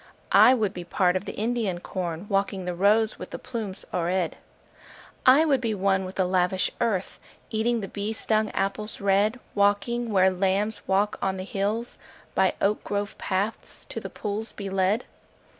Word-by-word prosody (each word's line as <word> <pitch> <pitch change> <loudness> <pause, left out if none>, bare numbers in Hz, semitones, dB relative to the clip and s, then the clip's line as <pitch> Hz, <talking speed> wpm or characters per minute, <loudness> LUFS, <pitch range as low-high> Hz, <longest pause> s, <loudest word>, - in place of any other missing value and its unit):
I 255 - +8
would 210 -5 0
be 180 - -6
part 180 +1 +1
of 185 +2 -1
the - - -6
Indian 220 -4 -1
corn, 175 -1 -4
Walking 195 -2 0
the 180 - -2
rows 210 +4 +3
with - - -7
the - - -6
plumes 225 -7 -6
o'erhead. 175 0 0 0.9
I 275 +5 +7
would 275 -5 +2
be 225 -3 -1
one 190 -1 +1
with 185 - -8
the 190 - +2
lavish 185 0 +1
earth, 210 -6 -1 0.3
Eating 230 +1 +1
the 195 - -4
bee 205 +2 -3
stung 215 -1 0
apples 210 +2 -2
red: 200 +4 +2
Walking 205 +4 +1
where 190 -1 +5
lambs 195 +3 0
walk 200 +2 +1
on 190 -1 0
the 185 - -4
hills; 205 +5 -2 0.3
By - - +2
oak 205 +1 +1
grove 205 0 -3
paths 200 +3 -3
to - - -4
the - - -7
pools 210 +2 -4
be 195 -2 -6
led. 195 +4 +1
200 Hz, 175 wpm, -26 LUFS, 190-220 Hz, 0.9 s, I